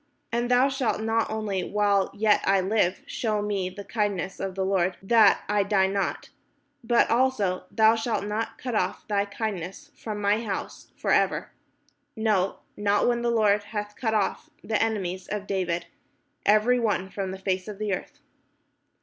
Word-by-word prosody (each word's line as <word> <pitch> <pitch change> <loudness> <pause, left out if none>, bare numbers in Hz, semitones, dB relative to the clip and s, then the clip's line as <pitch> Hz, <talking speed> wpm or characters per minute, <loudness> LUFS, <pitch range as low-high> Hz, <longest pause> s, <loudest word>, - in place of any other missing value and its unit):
And 240 +1 0
thou 250 +2 +5
shalt 260 -6 -1
not 225 +1 0
only 210 -4 -2
while 200 0 +1
yet 210 0 +3
I 195 0 +3
live 190 -1 +1
shew 215 -3 -1
me 200 -3 -1
the 200 +2 -9
kindness 200 -3 -2
of 190 -1 -4
the 190 -1 -1
Lord, 190 -1 +1
that 215 0 +5
I 210 0 +2
die 195 -1 +2
not: 195 +1 -2 0.5
but 235 0 +3
also 230 -7 +1
thou 220 0 +4
shalt 225 -2 -1
not 225 +2 -3
cut 250 -2 -5
off 185 -4 -1
thy 200 -1 +1
kindness 205 - -5
from 215 -2 -5
my 205 +2 +2
house 200 -4 -5
for - - -1
ever: - - +2 0.6
no, 210 -4 0
not 205 0 +2
when 240 -1 +1
the 240 - +1
Lord 210 -3 +3
hath 210 -1 -5
cut 220 -3 -1
off 210 +8 -1
the 215 -2 0
enemies 190 -5 -2
of 205 -1 -4
David 175 -4 -1 0.6
every 215 +4 +4
one 205 -4 -1
from 195 -2 -3
the 190 - -5
face 190 0 -2
of 210 -2 -6
the 210 -1 -1
earth." - - -6
210 Hz, 170 wpm, -26 LUFS, 195-225 Hz, 0.6 s, thou